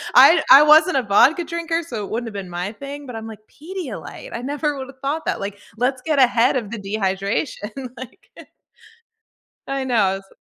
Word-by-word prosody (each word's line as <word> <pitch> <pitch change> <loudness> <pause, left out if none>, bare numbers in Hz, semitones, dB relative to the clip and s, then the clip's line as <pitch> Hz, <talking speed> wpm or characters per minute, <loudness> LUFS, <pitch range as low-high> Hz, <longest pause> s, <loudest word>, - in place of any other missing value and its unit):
I 330 -1 +7
I 275 +2 +11
wasn't 310 +2 +6
a 265 - +3
vodka 255 - +4
drinker, 335 0 -2
so 225 -10 -5
it - - -11
wouldn't 230 +1 -3
have 220 - -8
been 190 -2 -6
my 180 +4 -4
thing, 280 +4 -9
but 245 - -8
I'm 225 - -6
like, 215 -2 -10
"Pedialyte, 335 - -8
I 235 - -4
never 290 +1 -2
would 260 -1 -6
have 265 -1 -15
thought 295 +4 -2
that." - - -1
Like, 200 0 -5 0.2
let's 250 +1 0
get 305 -3 0
ahead 245 0 +4
of 220 -5 -4
the 235 - -4
dehydration, 205 +5 -3
like 255 -1 -12 1.4
I 275 -1 -2
know 205 -7 +1
s 195 0 -17
255 Hz, 195 wpm, -21 LUFS, 210-290 Hz, 1.4 s, I